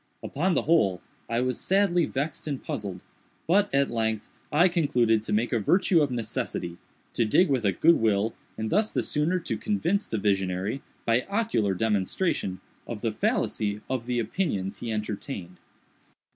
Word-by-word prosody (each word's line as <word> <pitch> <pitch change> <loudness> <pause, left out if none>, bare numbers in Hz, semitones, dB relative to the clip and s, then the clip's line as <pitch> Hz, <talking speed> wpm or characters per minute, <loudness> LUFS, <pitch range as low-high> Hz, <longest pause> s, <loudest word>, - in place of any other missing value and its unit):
Upon 185 -1 0
the - - +2
whole, 100 - +3 0.3
I 115 +1 +1
was 130 0 -1
sadly 185 -4 +2
vexed 145 +4 -3
and 140 -3 -2
puzzled, 95 -3 -5 0.4
but, 200 +4 +3
at 140 -2 +2
length, 110 -2 -1 0.2
I 170 +5 +5
concluded 125 - +2
to 110 - -5
make 110 +4 +1
a 115 - +2
virtue 175 - +3
of 145 - +2
necessity—to 110 -3 -4
dig 165 - +4
with 130 -5 +1
a 100 - +4
good 165 - +4
will, 110 0 +2 0.2
and 110 0 -3
thus 210 +3 +2
the - - 0
sooner 160 +5 +1
to - - -3
convince 200 -1 0
the 110 - -2
visionary, 95 +3 0 0.2
by 115 +2 +2
ocular 120 - +1
demonstration, 100 - 0 0.3
of - - -5
the - - 0
fallacy 105 -1 -1
of 125 -2 -2
the 125 -1 0
opinions 105 - -2
he 115 - -4
entertained. 105 -3 -5
120 Hz, 160 wpm, -27 LUFS, 105-165 Hz, 0.4 s, I